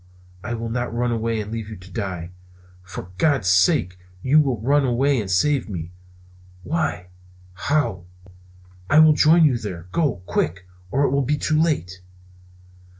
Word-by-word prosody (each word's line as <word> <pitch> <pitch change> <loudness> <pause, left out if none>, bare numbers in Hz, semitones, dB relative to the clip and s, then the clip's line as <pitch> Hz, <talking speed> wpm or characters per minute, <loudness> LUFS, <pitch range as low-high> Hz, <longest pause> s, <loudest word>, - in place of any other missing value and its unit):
I 120 +2 -3
will 115 0 -5
not 120 +1 -2
run 120 +1 -1
away 115 -1 -1
and 105 0 -5
leave 110 -2 -5
you 110 - -7
to 95 0 -14
die." 90 -5 -5 0.5
"For 90 0 -9
God's 140 - +2
sake 95 - +2 0.2
you 145 +4 +5
will 135 -7 +1
run 140 +6 +2
away 130 +1 +1
and 100 - -6
save 135 +7 +1
me." 85 -3 -6 0.7
"Why? 145 - -2 0.4
How?" 105 -3 -1 0.8
"I 155 - +4
will 155 0 +7
join 160 +2 +5
you 130 -5 +2
there, 90 -5 -7
go! 140 - -1
Quick, 90 +1 -2 0.2
or 135 +8 +1
it 140 - +2
will 140 +1 +2
be 145 +3 0
too 155 +1 +1
late!" 90 - -1
115 Hz, 160 wpm, -22 LUFS, 95-145 Hz, 0.8 s, will